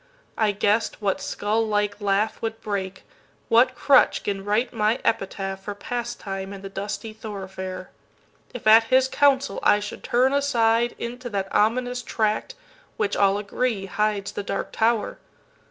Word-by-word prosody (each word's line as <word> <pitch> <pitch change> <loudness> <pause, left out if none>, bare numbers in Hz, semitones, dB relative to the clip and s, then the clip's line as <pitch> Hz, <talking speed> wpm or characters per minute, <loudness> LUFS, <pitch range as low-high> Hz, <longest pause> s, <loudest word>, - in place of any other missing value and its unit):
I 215 -2 +2
guess'd 205 +2 +1
what 205 +6 -1
skull 225 -5 -1
like 205 -1 -1
laughWould 215 +2 -1
break, 190 -2 -4 0.5
what 250 +3 +4
crutch 275 -2 +4
'gin 195 -1 -3
write 215 +5 0
my 215 +1 +1
epitaphFor 195 -1 -2
pastime 200 -5 -5
in 195 0 -10
the 195 - -6
dusty 205 +2 -5
thoroughfare, 190 -3 -7 0.6
If 245 - -9
at 220 +1 +7
his 260 +2 +4
counsel 275 -5 +2
I 205 - +4
should 205 0 -7
turn 255 +2 +2
asideInto 240 -2 0
that 195 -3 -3
ominous 245 +3 +1
tract 220 - -1 0.4
which, 205 -1 0
all 200 0 +3
agree, 205 0 -2
Hides 205 0 -1
the - - -4
Dark 200 - -4
Tower. 225 -1 0
215 Hz, 140 wpm, -24 LUFS, 200-235 Hz, 0.6 s, at